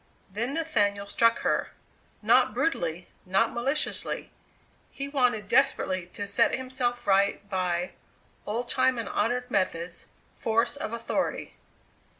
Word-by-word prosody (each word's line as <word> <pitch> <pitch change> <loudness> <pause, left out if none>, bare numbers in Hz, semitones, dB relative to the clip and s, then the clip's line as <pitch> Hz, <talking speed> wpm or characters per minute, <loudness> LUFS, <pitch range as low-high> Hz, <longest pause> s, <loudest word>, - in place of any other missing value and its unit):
Then 235 +8 -2
Nathaniel 205 -11 +1
struck 230 +3 +2
her. - - 0 0.5
Not - - +4
brutally, 175 - -1 0.2
not 190 +5 +1
maliciously; 270 +6 -1 0.6
he 275 0 -5
wanted 250 -7 +1
desperately 190 -9 +2
to 205 - -4
set 200 0 +3
himself 255 -2 -2
right 200 +1 +2
by 180 -1 -1 0.6
old 235 +4 -2
time 260 0 +3
and 230 - -3
honoured 250 +2 -1
methods 170 -2 -1 0.3
force 230 +4 0
of 285 - -4
authority! 230 0 -2
230 Hz, 120 wpm, -27 LUFS, 195-255 Hz, 0.6 s, Not